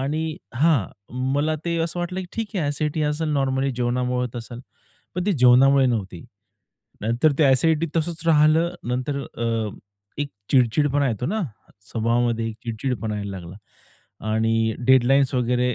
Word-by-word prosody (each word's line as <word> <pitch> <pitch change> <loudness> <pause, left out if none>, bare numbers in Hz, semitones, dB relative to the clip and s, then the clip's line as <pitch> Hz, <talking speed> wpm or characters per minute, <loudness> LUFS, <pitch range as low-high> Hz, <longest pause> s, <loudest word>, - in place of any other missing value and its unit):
आणि 155 +4 -2 0.2
हां. 140 - +3 0.5
मला 155 +2 +1
ते 170 -1 -1
असं 170 +1 -5
वाटलं, 180 +2 -3
की 180 - -7
ठीक 220 -2 -4
आहे 150 -5 0
एसिडिटी 150 +1 -1
असेल 150 +2 -1
नॉर्मली 135 -1 +1
जेवणामुळे 125 +1 0
होत 120 - -10
असेल. 120 +1 -7 0.5
पण 180 0 -2
ते 205 - +3
जेवणामुळे 135 -1 +5
नव्हती, 95 -8 -3 0.8
नंतर 120 +8 +2
ते 155 - +5
एसिडिटी 160 +4 +3
तसंच 165 0 -2
राहिले 155 0 +5 0.3
नंतर 130 +3 -1
अ, 115 -3 -2 0.5
एक 145 -1 -1 0.2
चिड-चिडपणा 140 +3 +3
येतो 120 +2 -2
ना? 215 +5 -1 0.5
स्वभावामध्ये 115 0 0
चिड-चिडपणा 115 0 -4
यायला 100 -1 -4
लागला 85 +2 -10 0.7
आणि 110 0 +1
डेडलाईन्स 130 +1 +4
वगैरे 125 0 +1
130 Hz, 140 wpm, -23 LUFS, 115-155 Hz, 0.8 s, जेवणामुळे